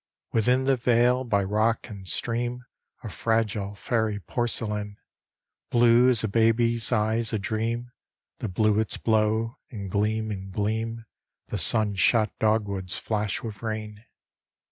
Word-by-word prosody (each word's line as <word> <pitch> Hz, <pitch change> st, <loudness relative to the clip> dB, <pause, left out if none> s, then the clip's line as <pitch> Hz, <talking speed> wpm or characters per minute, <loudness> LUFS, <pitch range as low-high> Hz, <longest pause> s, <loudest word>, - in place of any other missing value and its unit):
Within 125 Hz, +4 st, +3 dB
the 135 Hz, 0 st, +2 dB
vale, 125 Hz, +1 st, +3 dB
by 100 Hz, -5 st, +1 dB
rock 110 Hz, +4 st, +1 dB
and 100 Hz, -5 st, -10 dB
stream, 120 Hz, +4 st, -2 dB, 0.4 s
A 115 Hz, -, -5 dB
fragile, 105 Hz, -3 st, -1 dB
fairy 110 Hz, -1 st, -1 dB
porcelain, 105 Hz, -2 st, -3 dB, 0.7 s
Blue 120 Hz, +1 st, +5 dB
as 120 Hz, -4 st, +2 dB
a -, -, +1 dB
baby's 115 Hz, +2 st, +2 dB
eyes 110 Hz, +1 st, +1 dB
a -, -, +2 dB
dream, 115 Hz, +4 st, -2 dB, 0.5 s
The 110 Hz, -, -3 dB
bluets 110 Hz, +3 st, +1 dB
blow; 110 Hz, +2 st, +1 dB
and 100 Hz, -6 st, -6 dB
gleam 110 Hz, +1 st, 0 dB
in 95 Hz, -1 st, -6 dB
gleam 110 Hz, +3 st, -2 dB, 0.4 s
The -, -, -2 dB
sun 110 Hz, -3 st, +1 dB
shot 110 Hz, +2 st, +3 dB
dog 110 Hz, -1 st, +2 dB
woods 95 Hz, -2 st, -4 dB
flash 105 Hz, -2 st, -2 dB
with 110 Hz, -3 st, -7 dB
rain. 110 Hz, -1 st, -5 dB
110 Hz, 135 wpm, -26 LUFS, 105-115 Hz, 0.7 s, Blue